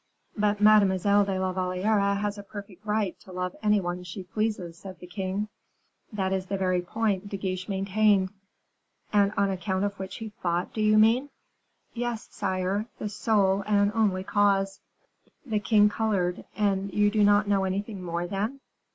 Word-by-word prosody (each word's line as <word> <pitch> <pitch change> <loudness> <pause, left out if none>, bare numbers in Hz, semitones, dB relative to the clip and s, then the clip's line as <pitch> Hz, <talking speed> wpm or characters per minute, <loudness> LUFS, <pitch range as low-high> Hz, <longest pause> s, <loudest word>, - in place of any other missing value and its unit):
"But 210 -1 +1
Mademoiselle 205 -1 +5
de 195 -1 -1
la 185 0 0
Valliere 200 +2 +1
has 205 0 -2
a 205 - -7
perfect 200 -1 -10
right 210 -3 0
to 185 - -14
love 180 0 -3
any 210 -1 +3
one 175 -1 -3
she 180 +2 -7
pleases," 190 -3 -2
said 190 -2 -9
the 180 - -11
king. 190 +2 -3 0.6
"That 190 -3 -1
is 190 -1 -2
the 195 - -2
very 185 -1 +1
point 200 +1 -1
De 200 - -4
Guiche 185 0 -4
maintained." 195 0 +2 0.8
"And 200 -1 +4
on 200 -1 +2
account 190 +1 -1
of 200 0 -4
which 190 0 -6
he 225 -1 -6
fought, 175 0 -1
do 215 - -2
you 215 0 +4
mean?" 230 +6 +4 0.6
"Yes, 240 -2 -3
sire, 190 +3 -1
the 210 - -4
sole 200 -2 +2
and 205 -1 +3
only 205 -5 +1
cause." 195 -1 +1 0.7
The 220 -5 0
king 210 -1 +4
colored. 200 -5 -1
"And 200 -2 0
you 205 +2 +3
do 215 -1 +3
not 205 +1 +4
know 200 -1 +2
anything 195 +1 -3
more, 170 -1 -3
then?" 205 +9 -3
200 Hz, 170 wpm, -27 LUFS, 185-210 Hz, 0.8 s, Mademoiselle